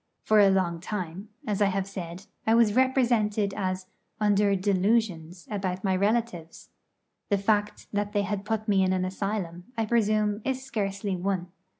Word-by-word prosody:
For 215 0 +4
a 200 -1 +7
long 185 -3 +1
time, 185 +1 -5 0.2
as 210 -2 -1
I 205 - +5
have 195 0 -1
said, 185 -1 -7 0.2
I 225 - +5
was 230 -3 +4
represented 235 -5 +2
as 185 -2 -2 0.3
under 205 -1 +3
'delusions' 185 -3 0
about 190 -2 -2
my 190 -2 +2
relatives. 205 -4 -1 0.6
The 200 - +3
fact 205 +1 0
that 205 0 -1
they 205 -1 0 0.2
put 215 +1 -2
me 200 -2 +3
in 185 0 +2
an 185 0 0
asylum, 185 -2 -3
I 225 - +1
presume, 215 -2 +1
is 265 0 -2
scarcely 200 -5 -2
one. 180 -1 -2
200 Hz, 160 wpm, -27 LUFS, 185-215 Hz, 0.6 s, a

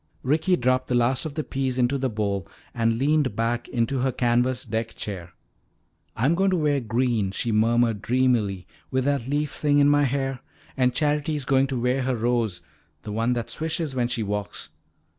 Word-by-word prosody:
Ricky 155 +7 +2
dropped 130 -2 +1
the 125 - 0
last 120 +4 +2
of 145 - -9
the 155 - -1
peas 135 -3 -2
into 130 +2 +1
the 130 0 0
bowl 100 -4 -2 0.3
and 115 -1 +1
leaned 145 0 +1
back 115 +1 -1
in 115 -2 0
her 130 -1 0
canvas 125 +1 +1
deck 115 0 -3
chair. 90 -4 -6 0.8
"I'm 130 +8 +2
going 195 +3 +2
to 185 - +1
wear 150 -3 +2
green," 115 -3 0
she 115 +4 -2
murmured 115 0 +2
dreamily, 115 -7 +1 0.2
"with 130 -1 0
that 140 -4 0
leaf 145 +1 -1
thing 145 -1 +1
in 145 0 +5
my 145 0 +4
hair. 135 -1 -1 0.4
And 125 -2 +2
Charity's 150 -1 0
going 135 +1 +3
to 130 -2 -2
wear 125 +2 +1
her 130 0 0
rose, 115 -4 0 0.4
the 105 - -6
one 115 +3 +1
that 120 -1 -3
swishes 160 -2 -2
when 125 -2 0
she 120 -2 -2
walks." 105 0 -4
125 Hz, 185 wpm, -25 LUFS, 115-140 Hz, 0.8 s, in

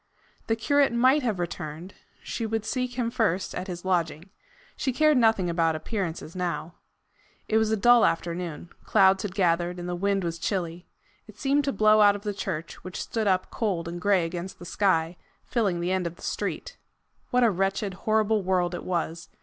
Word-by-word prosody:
The 225 - +2
curate 285 +4 +2
might 255 +5 +4
have 225 -6 -1
returned: 170 0 -5 0.3
she - - -4
would 220 0 -2
seek 250 0 -2
him 235 -2 0
first 215 -7 0
at 180 - -5
his 175 -1 -6
lodging. 175 -1 -1 0.4
She 265 - -1
cared 305 +3 +4
nothing 220 -6 +3
about 165 -1 +1
appearances 170 -2 -4
now. 170 -2 -3 0.7
It 220 - +3
was 220 -1 +1
a 220 - +1
dull 240 +2 +6
afternoon. 170 0 -2
Clouds 190 -2 +4
had 200 -4 -5
gathered, 175 -2 +1
and 175 0 -6
the 180 - -2
wind 195 +1 0
was 170 -1 -3
chilly. 175 -1 -3 0.4
It 215 -1 -14
seemed 275 +4 +1
to 275 - +1
blow 215 0 +4
out 205 -1 +6
of 205 - -8
the 210 -1 -2
church, 170 -5 -5
which 185 0 -6
stood 220 -2 -2
up 185 -1 +1
cold 190 -8 -2
and 175 +1 -6
gray 195 -3 +3
against 175 +2 -6
the 175 - -11
sky, 175 -3 +1 0.3
filling 200 -8 0
the 175 +1 -1
end 185 -2 0
of 170 - -7
the - - -16
street. - - -4 0.5
What 250 0 +3
a 230 - +5
wretched, 195 +1 -1
horrible 215 +2 +1
world 180 -1 0
it 175 - -5
was! 170 -2 -3
190 Hz, 190 wpm, -26 LUFS, 175-220 Hz, 0.7 s, dull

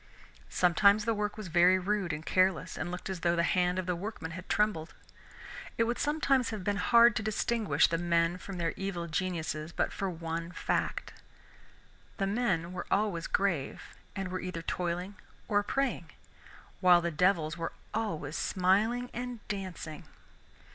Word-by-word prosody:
Sometimes 200 +4 +4
the 230 - +2
work 210 0 -2
was 215 -3 -6
very 175 +2 +5
rude 190 -1 -1
and 155 +1 -5
careless, 185 -1 +2
and 175 - -3
looked 180 0 -5
as 190 -2 -4
though 170 0 +2
the 170 - +2
hand 180 +1 +2
of 185 - -1
the 180 0 0
workman 175 -3 -5
had 180 +2 -8
trembled. 190 -7 0 0.8
It 230 - +4
would 235 +1 -1
sometimes 275 -4 +2
have 215 -4 -5
been 205 +1 0
hard 235 +2 +6
to - - 0
distinguish 215 -6 +2
the 165 - -1
men 170 0 +1
from 195 -1 -7
their 165 -2 0
evil 195 -3 -3
geniuses 160 -2 -2
but - - -1
for 195 - -2
one 165 0 -4
fact, - - -2 1.0
the 195 - 0
men 195 -5 0
were 185 - -5
always 195 -5 0
grave 175 -9 0 0.3
and 195 -2 -3
were 185 0 -3
either 180 -2 -5
toiling 180 +4 -3 0.3
or 205 -1 +3
praying, 235 - -1 0.7
while 180 -2 +6
the 170 0 -1
devils 160 -2 +2
were 165 -1 -3 0.2
always 165 -9 -2
smiling 210 +9 +1
and 245 -2 -6
dancing. 185 -6 -5
185 Hz, 160 wpm, -31 LUFS, 170-210 Hz, 1.0 s, hard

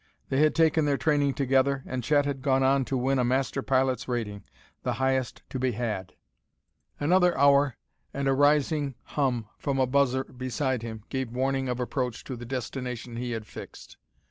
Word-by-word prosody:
They 135 - +1
had 155 0 +4
taken 160 -1 +3
their 140 -1 +2
training 145 -3 +2
together, 135 0 +2
and 125 -1 -4
Chet 145 +2 +3
had 140 -2 -3
gone 135 -1 +2
on 135 0 +3
to 135 - -1
win 130 +2 +1
a - - +3
master 130 +2 0
pilot's 130 -1 +1
rating, 110 -5 -3 0.4
the - - -1
highest 130 -1 -1
to 130 - -3
be 130 -1 0
had.... 105 -5 -3 0.8
Another 180 +4 +3
hour, 140 -1 +4 0.4
and 140 0 -2
a 135 - +4
rising 145 0 +2
hum 125 -6 -1
from 140 -1 -1
a 130 - +3
buzzer 130 0 +2
beside 130 0 -2
him 110 -2 -7
gave 130 -3 -2
warning 130 +2 -1
of 125 0 -2
approach 125 -1 -2
to 130 - -6
the 120 0 -8
destination 125 -1 -5
he 120 0 -3
had 110 -1 -4
fixed. - - -11
130 Hz, 180 wpm, -27 LUFS, 125-140 Hz, 0.8 s, had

